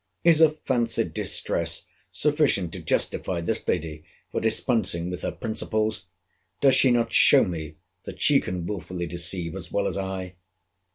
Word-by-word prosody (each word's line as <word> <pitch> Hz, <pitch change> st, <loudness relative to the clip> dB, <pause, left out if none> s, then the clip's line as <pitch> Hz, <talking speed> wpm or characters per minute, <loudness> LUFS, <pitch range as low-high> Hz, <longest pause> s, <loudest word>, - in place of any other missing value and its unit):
Is 165 Hz, -2 st, +5 dB
a 160 Hz, -, +8 dB
fancied 130 Hz, -6 st, -1 dB
distress, -, -, -1 dB, 0.3 s
sufficient 145 Hz, -, +1 dB
to -, -, -6 dB
justify 90 Hz, -2 st, -1 dB
this 95 Hz, +7 st, -2 dB
lady 80 Hz, -3 st, -2 dB, 0.3 s
for -, -, -2 dB
dispensing 110 Hz, -6 st, 0 dB
with 90 Hz, -, -5 dB
her -, -, -2 dB
principles? 110 Hz, -2 st, -2 dB, 0.5 s
Does 135 Hz, -1 st, +5 dB
she 130 Hz, -, +5 dB
not 120 Hz, -1 st, +1 dB
show -, -, +6 dB
me 80 Hz, -3 st, -5 dB, 0.3 s
that -, -, -8 dB
she -, -, +5 dB
can 90 Hz, -1 st, -5 dB
wilfully 90 Hz, -2 st, -5 dB
deceive, 85 Hz, 0 st, -2 dB
as 90 Hz, -4 st, -7 dB
well 100 Hz, -, 0 dB
as 100 Hz, -, -2 dB
I? 95 Hz, -1 st, -5 dB
95 Hz, 155 wpm, -25 LUFS, 85-120 Hz, 0.5 s, a